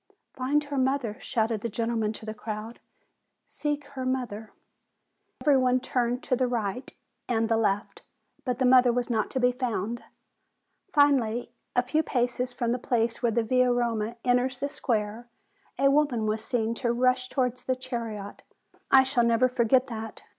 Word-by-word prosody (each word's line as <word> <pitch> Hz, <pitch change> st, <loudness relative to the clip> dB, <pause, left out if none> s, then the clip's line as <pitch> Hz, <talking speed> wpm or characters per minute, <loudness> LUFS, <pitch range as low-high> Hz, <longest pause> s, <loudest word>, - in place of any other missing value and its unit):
"Find 280 Hz, +4 st, +1 dB
her 285 Hz, -2 st, -3 dB
mother!" 260 Hz, -4 st, 0 dB
shouted 225 Hz, -2 st, -1 dB
the 235 Hz, -, -2 dB
gentleman 225 Hz, -1 st, -1 dB
to 215 Hz, -, -8 dB
the 215 Hz, -, -4 dB
crowd; 215 Hz, +1 st, -6 dB, 0.7 s
"seek 295 Hz, -1 st, -3 dB
her 270 Hz, -2 st, -6 dB
mother!" 245 Hz, -5 st, -3 dB, 0.9 s
And -, -, -11 dB
every 285 Hz, -2 st, +6 dB
one 255 Hz, -1 st, +3 dB
turned 245 Hz, 0 st, -1 dB
to 255 Hz, -, +1 dB
the 255 Hz, 0 st, +1 dB
right 240 Hz, 0 st, -3 dB, 0.4 s
and 225 Hz, -2 st, +1 dB
the 225 Hz, -, +2 dB
left; 205 Hz, -2 st, -1 dB, 0.4 s
but 250 Hz, -3 st, -1 dB
the 260 Hz, -, +1 dB
mother 250 Hz, -1 st, +6 dB
was 245 Hz, 0 st, -1 dB
not 220 Hz, -2 st, 0 dB
to 260 Hz, -, -2 dB
be 250 Hz, 0 st, +4 dB
found. 240 Hz, -3 st, -3 dB, 0.9 s
Finally, 245 Hz, -6 st, +3 dB, 0.2 s
a 245 Hz, -, +4 dB
few 305 Hz, +5 st, +1 dB
paces 245 Hz, -3 st, -1 dB
from 240 Hz, -2 st, -1 dB
the 250 Hz, -, -1 dB
place 235 Hz, -2 st, 0 dB
where 240 Hz, -2 st, +2 dB
the 230 Hz, +1 st, +1 dB
Via 255 Hz, +2 st, +3 dB
Roma 235 Hz, -2 st, -1 dB
enters 250 Hz, +1 st, +2 dB
the 280 Hz, +2 st, -2 dB
square, 235 Hz, -4 st, -2 dB, 0.5 s
a 275 Hz, +1 st, +4 dB
woman 275 Hz, -6 st, +2 dB
was 215 Hz, +1 st, -1 dB
seen 230 Hz, -2 st, -1 dB
to 240 Hz, -2 st, +1 dB
rush 255 Hz, +1 st, +1 dB
towards 250 Hz, -2 st, -1 dB
the 260 Hz, -, +1 dB
chariot. 230 Hz, -6 st, -6 dB, 0.3 s
Ah, -, -, -27 dB
I 265 Hz, -1 st, +7 dB
shall 260 Hz, -2 st, +1 dB
never 235 Hz, +2 st, +4 dB
forget 255 Hz, +1 st, +3 dB
that! 225 Hz, -3 st, -7 dB
245 Hz, 175 wpm, -27 LUFS, 225-255 Hz, 0.9 s, I